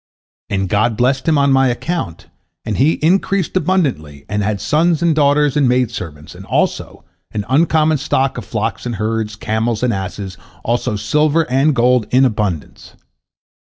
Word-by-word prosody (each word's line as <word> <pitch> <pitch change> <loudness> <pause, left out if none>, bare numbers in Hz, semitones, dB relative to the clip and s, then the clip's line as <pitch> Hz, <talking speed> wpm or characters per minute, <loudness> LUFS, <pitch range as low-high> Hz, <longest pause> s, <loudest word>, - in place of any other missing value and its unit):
And 95 -1 -1
God 110 +3 +1
blessed 130 +3 +1
him 160 -2 +3
on 140 -1 +3
my 135 0 +4
account, 120 - -3 0.4
and 110 -3 -2
he 150 +5 +3
increased 190 +2 +1
abundantly, 140 - -1
and 105 +1 -2
had 105 0 -1
sons 165 - +1
and 170 -1 +3
daughters 145 -1 +2
and 140 -4 +3
maid 125 -2 +1
servants, 75 -8 -8
and - - -11
also - - -2 0.3
an 105 -2 -3
uncommon 155 +1 +2
stock 135 +1 0
of - - -8
flocks 110 +2 -3
and 120 - -3
herds, 110 0 -2
camels 110 +2 -2
and 125 -2 +2
asses, 95 0 -5 0.3
also 120 -1 -1
silver 150 +9 +1
and 135 +3 +2
gold 125 -1 +2
in 130 +2 +4
abundance. 105 - -3
125 Hz, 160 wpm, -17 LUFS, 105-150 Hz, 0.4 s, my